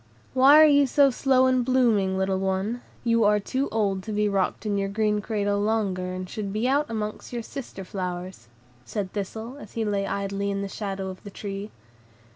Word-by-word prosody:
"Why 270 +3 +7
are 310 - +9
you 285 -1 +5
so 280 +1 +4
slow 260 0 +3
in 255 -1 +3
blooming, 235 -7 +2
little 190 0 0
one? 195 +5 -1 0.2
You 230 -1 +3
are 210 0 +4
too 260 +7 -2
old 200 -3 0
to 215 - -7
be 210 0 +1
rocked 200 +1 -1
in 210 -1 0
your 195 0 -1
green 210 0 0
cradle 205 -2 -1
longer, 200 -4 0
and 185 0 -5
should 200 +1 -5
be 215 +4 0
out 285 +3 +1
among 215 -2 -3
your 240 -2 -4
sister 235 -7 -7
flowers," 180 - -5 0.4
said 195 - -4
Thistle, 220 +6 -5
as 215 - -12
he 225 -1 -1
lay 200 -1 -1
idly 200 0 -2
in 200 0 -2
the - - -3
shadow 195 -1 -4
of 185 - -9
the 205 - -8
tree. 200 +1 -6
210 Hz, 200 wpm, -25 LUFS, 195-235 Hz, 0.4 s, are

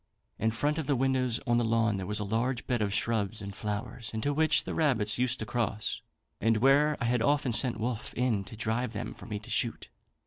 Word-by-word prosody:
In 110 - +2
front 145 +8 0
of 155 - -4
the 145 - +2
windows 130 -2 +1
on 120 -2 +3
the - - +1
lawn 115 -2 +2
there 95 -1 -4
was 105 0 +2
a - - -1
large 120 +4 -1
bed 120 -3 0
of 100 -1 0
shrubs 110 -1 -1
and 100 -1 -7
flowers, 105 +3 -4
into 125 +7 0
which 155 +2 +3
the - - -5
rabbits 120 -9 +1
used 125 0 +1
to 110 - -5
cross, 110 -2 -2 0.4
and 115 +1 +2
where 140 +5 +4
I - - -1
had 120 0 +1
often 140 0 +2
sent 120 -1 +4
Wolfe 115 0 -3
in 120 -5 +1
to 105 - -10
drive 115 +2 -1
them 105 - -4
for - - -12
me 105 -2 -3
to 105 - -11
shoot. - - 0
115 Hz, 230 wpm, -29 LUFS, 110-130 Hz, 0.4 s, where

